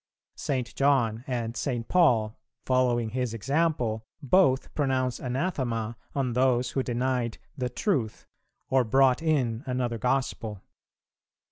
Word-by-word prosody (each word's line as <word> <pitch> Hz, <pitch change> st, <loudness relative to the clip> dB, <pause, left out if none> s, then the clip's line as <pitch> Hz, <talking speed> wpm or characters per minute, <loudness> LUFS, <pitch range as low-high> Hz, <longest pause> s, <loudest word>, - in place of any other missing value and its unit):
St. 130 Hz, -4 st, -2 dB
John 125 Hz, -5 st, +2 dB
and 120 Hz, -3 st, -2 dB
St. 120 Hz, -1 st, -2 dB
Paul, 120 Hz, -12 st, +3 dB, 0.3 s
following 125 Hz, -3 st, +2 dB
his 125 Hz, -1 st, -2 dB
example, 125 Hz, -2 st, 0 dB, 0.2 s
both 140 Hz, -3 st, +3 dB
pronounce 130 Hz, -3 st, 0 dB
anathema 125 Hz, -5 st, -2 dB, 0.2 s
on 130 Hz, -3 st, 0 dB
those 125 Hz, 0 st, +2 dB
who 135 Hz, -, 0 dB
denied 125 Hz, -1 st, -1 dB, 0.2 s
"the 125 Hz, -3 st, -2 dB
Truth" 125 Hz, -, -1 dB, 0.4 s
or 130 Hz, -1 st, +3 dB
"brought 130 Hz, +4 st, +3 dB
in 130 Hz, -8 st, +1 dB
another 125 Hz, -2 st, -1 dB
Gospel." 115 Hz, -4 st, -1 dB
125 Hz, 115 wpm, -27 LUFS, 115-135 Hz, 0.4 s, Paul